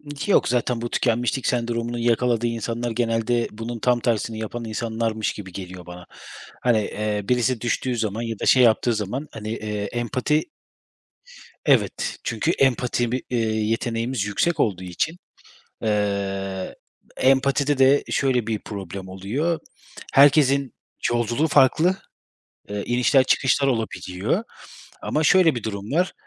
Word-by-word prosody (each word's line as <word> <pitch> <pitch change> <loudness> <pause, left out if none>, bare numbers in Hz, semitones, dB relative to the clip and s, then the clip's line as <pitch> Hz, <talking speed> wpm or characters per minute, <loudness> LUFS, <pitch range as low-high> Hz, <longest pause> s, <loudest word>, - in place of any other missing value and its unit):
Ki 200 +8 -2
yok - - +4
zaten 120 -1 0
bu 120 - -3
tükenmişlik 120 +2 0
sendromunun 120 -1 -1
yakaladığı 120 0 +1
insanlar 115 +1 -3
genelde 115 0 0
bunun 115 +2 -6
tam 125 0 +2
tersini 115 -1 -1
yapan 115 +2 -5
insanlarmış 110 0 -2
gibi 95 -3 -9
geliyor 90 -1 -8
bana. 90 0 -10 0.6
Hani, 120 -3 +3
eee, 105 0 -2
birisi 125 -1 +1
düştüğü 120 +1 -1
zaman 110 0 -2
ya 115 -3 -4
da - - -2
şey 130 -1 +6
yaptığı 115 +1 +3
zaman 110 +8 -3
hani, 105 0 -7
eee, 105 -2 -3
empati 130 +5 0 1.2
Evet, - - +1
çünkü - - 0
empati 125 -2 +1
bi 130 - -1
eee, 125 - -1
yeteneğimiz 115 +2 -1
yüksek 145 +11 0
olduğu 95 -4 0
için, 125 - -2 0.6
eee, 100 -3 -2 0.4
empatide 135 +1 +2
de 135 +2 +5
şöyle 125 -5 +1
bir 110 -2 -1
problem 95 -2 -7
oluyor: 125 - -2 0.5
Herkesin 140 -1 +5 0.4
yolculuğu 120 +6 +1
farklı, 160 +7 +4 0.7
ııı, 105 0 -3
inişler, 125 +2 +3
çıkışlar 140 +1 +2
olabiliyor 115 - -2 0.6
ama 155 +1 0
şöyle 180 -2 +5
bir 120 - -4
durum 105 +2 -5
var. 180 +3 +1
120 Hz, 135 wpm, -23 LUFS, 105-130 Hz, 1.2 s, şey